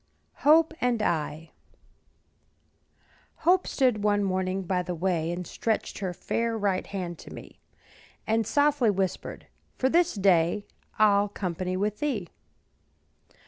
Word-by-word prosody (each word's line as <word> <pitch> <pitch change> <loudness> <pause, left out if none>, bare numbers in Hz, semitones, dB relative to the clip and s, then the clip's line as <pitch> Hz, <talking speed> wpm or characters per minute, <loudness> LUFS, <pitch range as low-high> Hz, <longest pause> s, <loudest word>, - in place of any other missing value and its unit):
HOPE 315 +2 +5
AND 240 -3 +1
I. 160 -1 -2 1.9
Hope 365 +2 +4
stood 250 -6 +1
one 205 -1 +2
morning 185 0 -1
by 180 0 0
the 180 0 -4
way, 170 -1 0
And 175 +1 -4
stretched 220 +6 -2
her 190 -3 -2
fair 230 +5 -2
right 200 -3 -1
hand 180 -4 -5
to - - -12
me, - - -11 0.7
And 220 -1 +1
softly 285 -5 +3
whispered, 190 -2 -2 0.3
"For 260 - +2
this 345 0 +2
day 190 0 +2 0.3
I'll 205 -1 +4
company 185 -1 -3
with 210 +2 -1
thee." 230 - -2
200 Hz, 125 wpm, -27 LUFS, 180-230 Hz, 1.9 s, HOPE